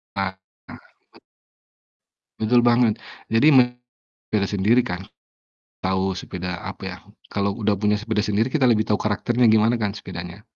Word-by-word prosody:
Ah, 95 -1 -2 0.3
bet - - -12 1.6
betul 120 +2 +3
banget. 120 -2 +4 0.3
Jadi 115 +6 +3
me 125 -2 +5 0.5
beda 105 -2 +1
sendiri 105 +5 +2
kan. 90 +3 -5 0.8
Tahu, 95 +1 0
sepeda 90 -1 -5
apa - - -8
ya, - - -5 0.3
kalau 100 0 -1
udah 105 -3 0
punya 105 0 +2
sepeda 110 +1 -3
sendiri 110 +4 0
kita 135 -2 +2
lebih 110 -3 +4
tahu 105 -1 0
karakternya 120 +3 +1
gimana 110 +2 +4
kan 105 -2 -2
sepedanya. 90 -1 -8
105 Hz, 140 wpm, -22 LUFS, 100-120 Hz, 1.6 s, me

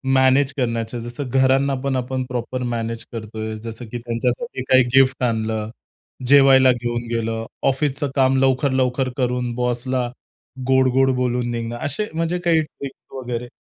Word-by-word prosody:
Manage 130 +1 +4
करण्याचे. 115 -2 -2
जसं 120 +3 -6
घरांना 135 +1 +3
पण 140 -1 0
आपण 130 +1 -2
प्रॉपर 125 +1 -3
मॅनेज 115 0 -4
करतोय 110 -1 -5
जसं 115 +1 -7
की 120 - -3
त्यांच्यासाठी 125 - -2
काही 130 0 +6
गिफ्ट 135 -1 +4
आणलं, 110 -2 -1 0.6
जेवायला 135 -1 +7
घेऊन 120 -1 -3
गेलं, 115 0 -2 0.2
ऑफिसचं 140 +1 0
काम 135 -1 +3
लवकर-लवकर 130 -1 +1
करून 125 -2 -1
बॉसला 125 +1 -1 0.6
गोड-गोड 130 0 +4
बोलून 125 -1 -1
निघणं, 115 0 -4
असे 180 +10 -1
म्हणजे 165 +2 -1
काही 170 -2 +3
ट्रिक्स 140 -3 -10
वगैरे? 125 -2 -4
125 Hz, 135 wpm, -21 LUFS, 120-135 Hz, 0.6 s, जेवायला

